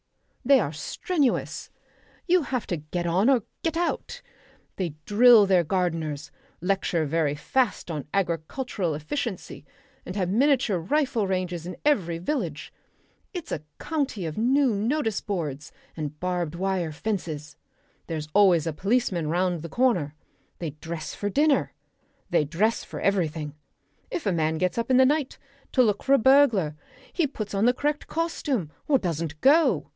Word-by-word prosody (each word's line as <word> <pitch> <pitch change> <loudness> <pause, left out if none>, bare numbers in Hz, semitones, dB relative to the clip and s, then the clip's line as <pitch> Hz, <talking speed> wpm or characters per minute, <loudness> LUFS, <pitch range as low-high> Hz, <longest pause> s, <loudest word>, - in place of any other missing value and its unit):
They 275 +1 +6
are 155 -8 -2
strenuous. 285 - -1 0.6
You 360 0 +4
have 255 -5 -2
to 175 - -1
get 155 +4 -4
on 185 +8 +3
or 255 -6 +3 0.2
get 330 -1 -1
out. 350 +7 -2 0.5
They 175 -6 -3
drill 225 0 +7
their 185 -3 +4
gardeners, 165 -4 -2 0.3
lecture 180 -3 0
very 150 -1 0
fast 240 - 0
on 150 -3 -5
agricultural 180 - -1
efficiency, 195 - -4 0.4
and 180 - -7
have 185 -3 0
miniature 240 -3 +2
rifle 250 - 0
ranges 180 -3 -2
in 180 - -6
every 185 - +2
village. 270 - -3 0.6
It's 355 -4 -7
a 150 - -2 0.2
county 280 - -2
of 155 -1 -5
new 260 +2 +3
notice 225 +1 0
boards 150 -8 -4 0.2
and 150 -1 -5
barbed 175 -3 -2
wire 185 -2 -1
fences; 155 -5 -4 0.5
there's 155 -2 -4
always 185 -6 +5
a 165 - -2
policeman 195 -3 0
round 175 0 0
the 165 - -7
corner. 180 - +1 0.4
They 165 -3 -4
dress 155 +2 -6
for 205 - -3
dinner. 290 +6 +2 0.6
They 170 - +3
dress 195 +10 0
for - - -8
everything. 160 -6 0 0.6
If 350 - -4
a 200 - +2
man 160 -1 0
gets 185 +6 0
up 230 - -2
in 255 - +5
the 260 - +7
night 290 0 0 0.4
to 255 - +5
look 210 -3 +1
for 275 - +2
a - - +7
burglar 235 - +4 0.4
he 340 -5 +1
puts 215 -7 -6
on 200 +2 +2
the 245 - +5
correct 295 +3 -2
costume 290 - -2 0.2
or 285 - +5
doesn't 165 - -3
go. 310 +5 +4
190 Hz, 155 wpm, -26 LUFS, 165-255 Hz, 0.6 s, drill